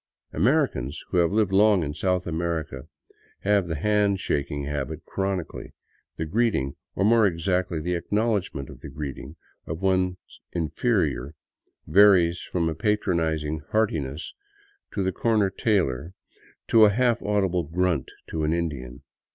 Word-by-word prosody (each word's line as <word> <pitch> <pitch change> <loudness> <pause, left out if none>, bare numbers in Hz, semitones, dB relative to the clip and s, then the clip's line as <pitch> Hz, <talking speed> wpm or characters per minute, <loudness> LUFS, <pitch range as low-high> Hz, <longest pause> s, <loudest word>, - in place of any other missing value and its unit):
Americans 110 - +1
who 90 - -1
have 85 0 +3
lived 105 -2 +2
long 100 -2 +4
in 75 -1 -3
South 90 +2 0
America 80 -5 -3 0.5
have 100 -2 +2
the 80 - -2
hand 105 +3 +2
shaking 70 -3 -2
habit 75 +2 -4
chronically. 95 -3 -4 0.4
The 80 - -2
greeting, 85 - 0 0.2
or 95 - +1
more 110 -1 +5
exactly 90 0 -1
the 90 +3 -2
acknowledgment 100 - -1
of - - -13
the - - -9
greeting, 70 0 -7 0.3
of 80 +4 -5
one's 95 -1 +2 0.4
inferior 80 - 0 0.5
varies 90 -4 +5
from 85 -2 -1
a 80 - 0
patronizing 80 -6 0
heartiness 80 -9 -1 0.6
to 100 - 0
the 95 - 0
corner 105 -1 +1
tailor 90 - 0 0.6
to 110 -1 +7
a - - +6
half 120 +2 +2
audible 95 -4 +1
grunt 85 -2 -1 0.2
to 80 -1 -2
an 75 +1 +1
Indian. 70 -8 -4
90 Hz, 135 wpm, -25 LUFS, 80-100 Hz, 0.6 s, to